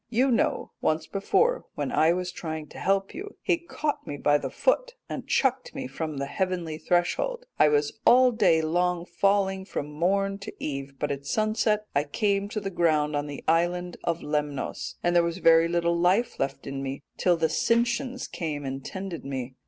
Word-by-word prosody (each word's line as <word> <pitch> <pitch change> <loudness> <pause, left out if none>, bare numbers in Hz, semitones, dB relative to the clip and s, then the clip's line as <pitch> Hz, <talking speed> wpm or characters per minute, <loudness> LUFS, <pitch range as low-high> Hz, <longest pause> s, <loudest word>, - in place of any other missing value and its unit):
You 255 +3 +2
know 235 - +1
once 155 0 +1
before 470 - +1
when - - -2
I 160 +1 +4
was 180 +1 -1
trying 160 -3 -5
to - - -10
help 195 0 +1
you 410 +2 -7
he 340 - +2
caught 310 -3 -3
me 145 - -4
by 145 +1 +3
the - - -4
foot - - +1
and - - -6
chucked 260 -1 +1
me 270 -1 -4
from 160 - -4
the 140 - -2
heavenly 170 0 -2
threshold. 485 - 0
I - - +7
was 150 +6 +1
all 255 +1 +6
day 180 -8 +3
long 175 +2 0
falling 195 +1 +1
from 150 -6 -5
morn 195 +5 0
to 200 - -7
eve, 140 -1 -5
but 145 - -2
at 140 0 -5
sunset 215 - +1
I 140 +1 +2
came 200 +6 0
to 210 -2 -3
ground 155 -4 +2
on 145 0 -1
the 145 -1 -7
island 175 +2 +1
of 170 0 -1
Lemnos, 150 -2 -3
and 175 0 +2
there 175 - +7
was 170 +1 -2
very 165 -2 +5
little 170 0 +1
life 185 +7 +2
left 135 0 -2
in 135 0 -4
me, 135 +1 -5
till 175 -2 +3
the 165 - +1
Sintians 235 - 0
came 150 -4 -4
and 135 0 -4
tended 190 -1 -6
me.' 130 -2 -4
175 Hz, 190 wpm, -27 LUFS, 150-210 Hz, -, I